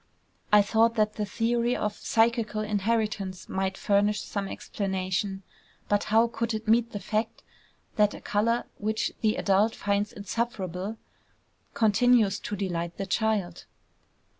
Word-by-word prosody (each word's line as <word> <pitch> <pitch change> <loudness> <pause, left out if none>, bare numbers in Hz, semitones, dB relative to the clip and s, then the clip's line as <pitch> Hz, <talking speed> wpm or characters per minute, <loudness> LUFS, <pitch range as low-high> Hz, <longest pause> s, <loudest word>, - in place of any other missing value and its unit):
I 210 -1 +7
thought 225 +2 +3
that 215 -1 +2
the 210 -1 -3
theory 235 +3 0
of 210 0 -1
psychical 225 -1 +1
inheritance 210 -2 -1
might 190 0 -2
furnish 205 0 +2
some 200 -1 -3
explanation; 190 0 -3 0.4
but 205 0 +1
how 225 +2 +4
could 230 -1 -2
it 215 +1 -6
meet 230 +1 +3
the 205 - -4
fact 215 +3 -2 0.5
that 210 -1 +3
a - - -9
color, 230 +3 +1 0.2
which 215 +1 -1
the 215 -1 +2
adult 205 +3 +2
finds 205 +1 0
insufferable, 200 -2 -3 0.8
continues 220 -1 +3
to 210 - -4
delight 175 -3 -3
the 195 - -3
child? 205 -5 -1
210 Hz, 135 wpm, -27 LUFS, 195-225 Hz, 0.8 s, I